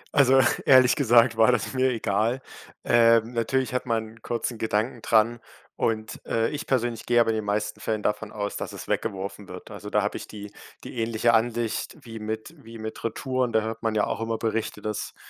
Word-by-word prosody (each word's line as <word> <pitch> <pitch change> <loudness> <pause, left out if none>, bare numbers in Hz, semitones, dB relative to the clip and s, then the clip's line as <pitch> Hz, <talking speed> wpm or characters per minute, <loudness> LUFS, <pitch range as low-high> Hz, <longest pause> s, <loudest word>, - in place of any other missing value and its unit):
Also 135 -2 +6 0.3
ehrlich 130 -2 +7
gesagt 120 -4 +4
war 110 +2 +6
das 120 -1 -1
mir 130 0 +2
egal. 115 +1 0 0.4
Ähm, 115 0 +4
natürlich 125 +2 0
hat 125 0 -2
man 110 -1 -1
'n - - -22
kurzen 120 0 -3
Gedanken 110 +2 -1
dran 115 +2 +3 0.4
und 110 -1 -2
äh, 115 0 +1
ich 150 +2 -5
persönlich 120 -3 -1
gehe 120 0 +4
aber 115 -1 +4
in 110 - -1
den 110 - -2
meisten 105 +1 -2
Fällen 110 -1 -2
davon 105 0 -1
aus, 105 -1 -4
dass - - -5
es - - -8
weggeworfen 100 +1 -3
wird. 90 +4 -10
Also 105 0 -8
da 105 -1 +2
habe 105 - -2
ich - - -8
die 105 -1 -9 0.3
die 120 - -7
ähnliche 115 +1 +2
Ansicht 115 0 0
wie 115 -1 -8
mit 110 +6 -5
wie 115 0 -11
mit 110 0 -7
Retouren. 130 +2 -1
Da 110 - +4
hört 110 +1 -5
man 110 -1 -1
ja 105 - +3
auch - - -3
immer 115 0 -1
Berichte, 110 -2 -2
dass 105 -1 -4
115 Hz, 205 wpm, -25 LUFS, 110-120 Hz, 0.4 s, ehrlich